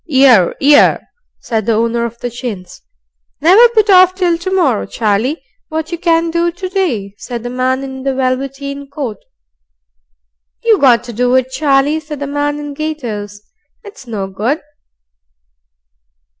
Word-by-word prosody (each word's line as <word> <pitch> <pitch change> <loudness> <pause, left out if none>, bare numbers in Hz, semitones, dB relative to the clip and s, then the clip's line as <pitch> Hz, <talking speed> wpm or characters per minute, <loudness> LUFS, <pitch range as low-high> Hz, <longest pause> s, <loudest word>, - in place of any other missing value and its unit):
"'Ear, 260 - +5
'ear," 290 +1 +5 0.4
said 220 -3 -3
the 230 - +3
owner 230 +1 0
of 235 0 -6
the 245 - -4
chins. 195 -7 -7 0.6
"Never 395 +10 +6
put 440 -2 +2
off 370 -2 +6
till 360 -3 +1
to 345 +3 -5
morrow, 355 - +1
Charlie, 225 +8 -1 0.3
what 315 +1 -4
you 340 - -4
can 335 -1 +1
do 340 +1 0
to 370 +2 -6
day," 265 - -2
said 240 -2 -6
the 245 - -5
man 255 +1 -1
in 265 -1 -7
the 270 0 -2
velveteen 275 +2 -3
coat. 275 -7 -5 1.5
"You 450 -4 +3
got 250 -4 +4
to 240 -1 -8
do 245 +3 +1
it, 260 0 +1
Charlie," 280 +2 +1
said 300 -2 -8
the 285 - -3
man 290 +1 -2
in 290 -1 -6
gaiters. 235 -10 -5 0.4
"It's 405 - -13
no 210 -4 -3
good." 215 +11 -2
275 Hz, 155 wpm, -15 LUFS, 235-320 Hz, 1.5 s, Never